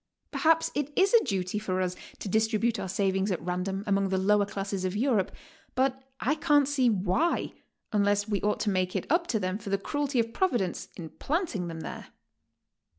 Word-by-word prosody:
Perhaps 325 0 +3
it 295 0 -2
is 390 +2 +4
a 465 - +7
duty 195 -3 -1
for 185 -3 -2
us 180 -1 -1 0.2
to - - -6
distribute 220 +3 +1
our 190 - -4
savings 195 +1 +1
at 180 - -1
random 180 +3 -2
among 195 -2 +1
the 190 - +1
lower 200 +1 +3
classes 195 -2 -3
of 185 +1 -1
Europe, 220 -4 +1 0.4
but 260 0 +1 0.2
I 265 +7 +1
can't 295 -2 +3
see 270 -4 +3
why, 205 - +1 0.4
unless 205 0 +2
we 205 -2 -1
ought 210 0 0
to 210 - +1
make 185 -1 0
it - - -1
up 340 +1 +3
to 220 - 0
them 185 +1 -2
for 205 - -7
the 195 - +2
cruelty 285 +5 -1
of 230 0 0
Providence 240 - 0
in 165 -3 -7
planting 275 - -2
them 165 -1 -6
there. - - -7
205 Hz, 195 wpm, -28 LUFS, 190-265 Hz, 0.4 s, a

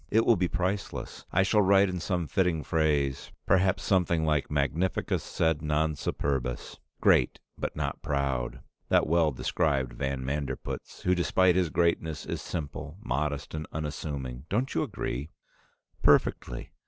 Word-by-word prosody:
It 110 +1 +3
will 115 - +6
be 90 -2 +1
priceless. 95 +3 -3
I 95 - +4
shall 105 +2 +3
write 100 0 +5
in 90 -1 -3
some 90 0 -1
fitting 85 -1 +1
phrase, 75 -3 0
perhaps 95 0 +3
something 85 -4 +2
like 75 -2 +1
Magnificus 75 +5 0
sed 80 -2 0
non 75 +1 +1
superbus. 65 -3 -2 0.2
'Great 60 - +4 0.2
but - - -4
not - - -3
proud!' 70 -4 -1 0.3
That - - +4
well 80 -1 +3
described 65 -1 0
van 65 +1 -3
Manderpootz, 70 +1 -4
who 90 - +3
despite 90 0 +3
his 90 -3 +2
greatness 80 -2 0
is - - -4
simple, 75 +1 -5
modest, 75 -8 -2
and 75 -1 -4
unassuming. 70 -3 -5
Don't 125 +6 0
you - - +1
agree?" 65 +6 -3 0.7
"Perfectly! - - +2
80 Hz, 140 wpm, -28 LUFS, 70-90 Hz, 0.7 s, will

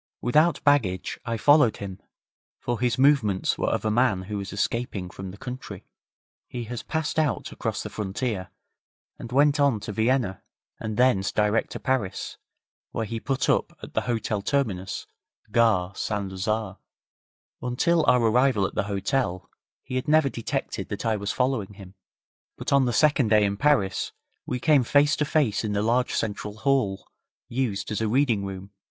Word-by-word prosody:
Without 155 +7 +2
baggage 115 - +1
I 115 0 -2
followed 145 0 +5
him, 95 -2 -7 0.6
for 120 -1 -3
his 125 -1 +1
movements 130 -9 +3
were - - +1
of - - -1
a 110 - +2
man 110 -5 +2
who 105 +2 -5
was 100 0 -6
escaping 100 -3 -2
from 95 0 -7
the 95 - -10
country. 125 -5 -8 0.6
He 120 -2 -5 0.2
passed 160 0 -1
out 155 -4 -1
across - - -3
the - - -6
frontier, 100 -1 -3 0.7
and 120 - -8
went 145 +3 +4
on 140 -6 +3
to - - -5
Vienna, 110 -2 0 0.4
and 110 -1 -4
thence 125 -6 +3
direct 105 +1 +1
to - - -5
Paris, 130 -8 -2 0.5
where 115 - -3
he 115 +1 -4
put 135 +3 -1
up - - +1
at - - -9
the - - +1
Hotel 115 -3 -2
Terminus, 100 -7 -1 0.5
Gare 105 -6 +3
St 100 -1 -3
Lazare. 100 +1 -2 0.8
Until 160 +7 +1
our 125 -1 +5
arrival 120 -2 +3
at - - -4
the - - -1
hotel 100 -2 -1 0.3
he 130 - -4
had 130 +3 -3
never 155 -2 +4
detected 115 -3 -4
that - - -5
I 110 -1 +2
was 100 -1 -2
following 125 -6 -1
him, 95 -1 -12 0.6
but - - -2
on 140 -1 +5
the 120 - +1
second 145 -1 +3
day 105 -1 +4
in 100 0 0
Paris 130 -5 +1 0.3
we 125 - -2
came 145 0 +4
face 145 +4 +3
to 150 - +1
face 145 -9 +1
in 105 -2 -2
the 100 0 0
large 120 +3 +1
central 105 -1 -3
hall, 130 -7 0 0.4
used 115 -5 -2
as 105 - -2
a 110 - +1
reading 120 -3 +2
room. 95 0 -7
115 Hz, 170 wpm, -25 LUFS, 100-135 Hz, 0.8 s, followed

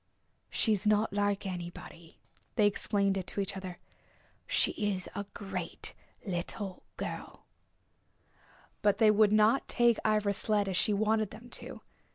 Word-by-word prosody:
"She 220 - +2
is 210 +1 0
not 210 0 +3
like 205 -1 0
anybody," 175 -2 -7 0.4
they 210 - +4
explained 200 -1 +1
it 190 - -4
to - - -3
each 195 -1 -1
other. 185 -2 -6 0.7
"She - - +3
is 205 -3 -1
a 200 0 -4
great 195 -4 -4 0.3
little 185 +1 -3 0.2
girl." - - -6 1.4
But 205 -1 +3
they 220 -1 +6
would 210 0 +5
not 215 +4 +4
take 240 -2 +3
Ivra's 210 -2 +2
sled 210 -2 +1
as 190 - -1
she 210 - +3
wanted 215 0 +2
them 235 +3 -12
to. - - -7
205 Hz, 145 wpm, -31 LUFS, 195-215 Hz, 1.4 s, they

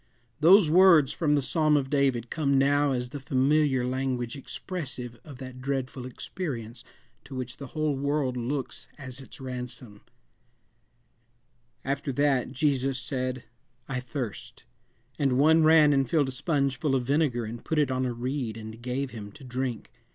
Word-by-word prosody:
Those 175 +4 +7
words, 165 -4 +6
from 150 -3 +1
the 145 - +1
Psalm 155 +1 +3
of 135 -1 -2
David, 135 -5 +1
come 140 -3 +1
now 145 +1 +3
as 125 -1 -2
the 145 - -6
familiar 135 0 +2
language 125 -1 -2
expressive 130 -5 -5
of 145 -4 -11
that 130 -1 -9
dreadful 130 -1 -3
experience 125 - -6 0.4
to 135 - -10
which 125 -2 -5
the 140 - -8
whole 155 -2 +1
world 140 -1 0
looks 130 +2 -4
as 130 -3 -8
its 135 +3 -11
ransom: 125 -4 -6 1.8
"After 140 +1 -2
that, 140 -2 +1
Jesus 135 -2 +1
said, 130 0 -3 0.4
I 135 -2 -2
thirst. 125 -3 -6 0.6
And 135 -3 +2
one 160 +4 +5
ran 155 -2 +6
and 135 -3 +1
filled 150 -5 +2
a - - -3
sponge 140 -1 0
full 145 -4 +1
of 130 - +1
vinegar 135 -3 +1
and 115 +2 -7
put 160 - -2
it 145 -3 +2
on 130 0 0
a - - -2
reed 120 -1 -3
and 110 +1 -9
gave 125 +2 -3
him 105 -3 -8
to - - -14
drink. 125 -2 -4
135 Hz, 160 wpm, -27 LUFS, 125-145 Hz, 1.8 s, Those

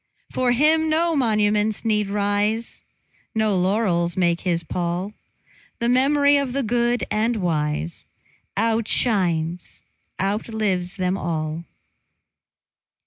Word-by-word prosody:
For 255 -1 +1
him 315 +5 +3
no 330 +1 +2
monuments 215 -4 +1
need 210 -2 +1
rise, 205 +2 -1 0.5
No 215 -2 +1
laurels 180 -2 +1
make 175 -2 +1
his 170 -3 -1
pall; 175 +4 -3 0.6
The 235 - -1
mem'ry 285 +3 +4
of 275 -3 -1
the 275 0 -1
good 240 +1 0
and 225 +3 +1
wise 150 - -2 0.5
Outshines, 200 -6 0 0.4
outlives 195 -2 -1
them 185 0 -1
all. 160 0 -3
210 Hz, 100 wpm, -22 LUFS, 180-235 Hz, 0.6 s, mem'ry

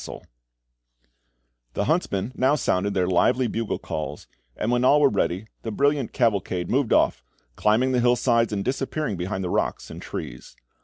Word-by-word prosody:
[Illustration: - - -10 0.7
BALFE] - - -47
The 100 - 0
huntsmen 110 - 0
now 135 +3 +2
sounded 100 -7 0
their 90 -2 +2
lively 95 +8 +2
bugle 115 -1 -2
calls, 75 -1 -6 0.3
and 110 - -1
when 120 0 +1
all 145 +3 +5
were 145 -2 +5
ready, 95 0 -1 0.2
the 115 - -5
brilliant 140 +2 +1
cavalcade 100 -7 0
moved 130 -2 +1
off, - - +2 0.3
climbing 115 +5 +2
the 125 - +2
hillsides, 120 -1 +2
and 100 -2 -2
disappearing 135 -1 -2
behind 95 +2 -3
the 90 - -3
rocks - - -2
and - - -8
trees. 60 - -8
110 Hz, 165 wpm, -24 LUFS, 90-130 Hz, 0.7 s, all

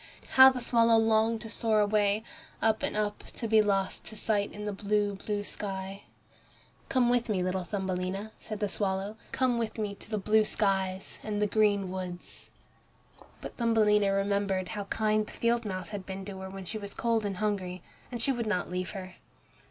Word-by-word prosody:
How 265 0 +9
the 260 -1 -3
swallow 230 -1 +4
longed 225 0 +3
to 225 - -7
soar 220 -2 +2
away, 210 0 +2 0.4
up 220 -1 +2
and - - -1
up, 210 -1 -1
to 230 - -3
be 220 0 +6
lost 195 -2 0
to 220 - -6
sight 210 -1 0
in 210 0 -7
the 210 - -2
blue, 205 +1 0
blue 205 +1 -3
sky! 195 -1 -6 0.8
"Come 255 -2 +3
with 240 -1 +2
me, 190 -4 +1
little 185 0 -1
Thumbelina," 190 +1 -3
said 215 -1 -6
the 205 - +2
swallow, 195 +1 -2 0.2
"come 250 -2 +1
with 230 -1 -3
me 210 -2 -2
to 200 - -11
the 215 - -1
blue 215 +2 +3
skies 195 -3 -1
and 210 -1 -3
the 210 - +3
green 205 -3 +2
woods." 180 -1 -7 0.9
But - - -8
Thumbelina 210 -4 +3
remembered 195 -2 0
how 205 +1 -4
kind 215 +1 +1
the - - -9
field 235 0 +1
mouse 185 -3 -4
had 205 -3 -5
been 190 0 -6
to 195 -1 -7
her 190 0 -6
when 195 0 -8
she 215 +4 -4
was 200 -1 -6
cold 230 -2 +1
and 200 -2 -3
hungry, 185 -4 -2 0.3
and 240 - -4
she 275 - +3
would 240 -3 -2
not 180 -4 -1
leave 180 0 -2
her. 185 -1 -8
205 Hz, 190 wpm, -29 LUFS, 195-220 Hz, 0.9 s, How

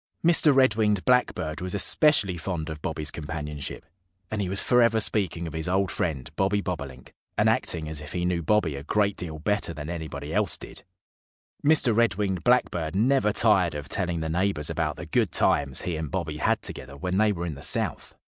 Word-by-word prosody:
Mr. 165 -3 +5
Red 130 -4 +4
winged 105 -3 +1
Blackbird 125 -11 +1
was 90 +1 -3
especially 100 - +3
fond 85 -2 -4
of 75 -1 -8
Bobby's 75 -3 -3
companionship. 75 -1 -6 0.5
And 110 -1 -1
he 95 - -2
was 100 +2 +2
forever 115 -2 +3
speaking 95 -6 -1
of 80 - -6
his 80 0 -3
old 95 0 +1
friend, 70 -7 -2
Bobby 100 +1 +1
Bobolink, 70 -9 -6 0.2
and - - +3
acting 80 -3 0
as 75 -1 -4
if 75 0 -9
he 90 -1 -2
knew 90 -1 0
Bobby 85 -4 +1
a 70 - -6
great 100 +5 +1
deal 80 -3 -6
better 105 0 -1
than 75 +2 -6
anybody 80 -3 -6
else 105 -2 +2
did. - - -9 0.8
Mr. 145 -6 +3
Red 115 -5 +3
winged 95 -3 -2
Blackbird 90 -10 +1
never 120 +1 +3
tired 95 -7 +2
of 75 -2 -6
telling 85 -2 -2
the 80 - -2
neighbors 85 -3 +1
about 75 -3 -1
the - - -8
good - - +1
times 70 -2 +1
he 90 - -2
and 80 -2 -4
Bobby 85 -4 -3
had - - 0
together 70 +2 -4
when 90 +5 -1
they 110 -1 +4
were 85 -3 -3
in 85 - -4
the 70 - -10
South. - - 0
90 Hz, 200 wpm, -26 LUFS, 80-105 Hz, 0.8 s, Mr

